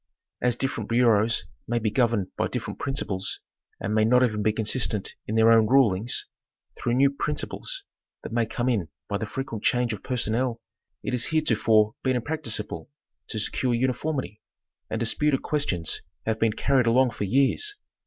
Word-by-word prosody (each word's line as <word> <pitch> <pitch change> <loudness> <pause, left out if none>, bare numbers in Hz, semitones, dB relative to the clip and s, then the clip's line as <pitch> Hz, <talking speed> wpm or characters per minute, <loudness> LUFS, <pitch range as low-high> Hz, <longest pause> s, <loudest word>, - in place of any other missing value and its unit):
As 125 -1 +2
different 135 +2 -3
bureaus 115 -2 +3 0.2
may 120 - 0
be 110 -2 0
governed 115 -7 +1
by - - 0
different - - -5
principles, 100 -8 -2 0.4
and 105 - -2
may 110 0 +4
not 125 +3 +5
even 110 -4 +1
be 110 +1 +3
consistent 110 -1 0
in 110 - -2
their 110 0 +6
own 115 -1 +6
rulings, 120 -3 +3 0.5
through 120 0 -1
new 135 +2 +4
principles 150 - -4 0.4
that - - -7
may 115 -1 +1
come 120 +2 -2
in 105 -10 +1 0.2
by 100 -1 -2
the 110 - -3
frequent 115 -3 -5
change 120 -2 +2
of 105 - -6
personnel, 120 0 -1 0.4
it - - -3
has 125 -2 +1
heretofore 110 -8 +3
been 130 -1 +1
impracticable 155 +5 -2 0.4
to 110 - -4
secure 120 +3 0
uniformity, 130 -2 -1 0.5
and 110 - -2
dis 115 - +1
puted 150 -3 +1
questions 95 - -1 0.2
have 110 0 0
been 110 -1 +2
carried 130 0 +2
along 125 +2 +4
for 105 - -3
years. 140 - +2
115 Hz, 165 wpm, -26 LUFS, 110-130 Hz, 0.5 s, their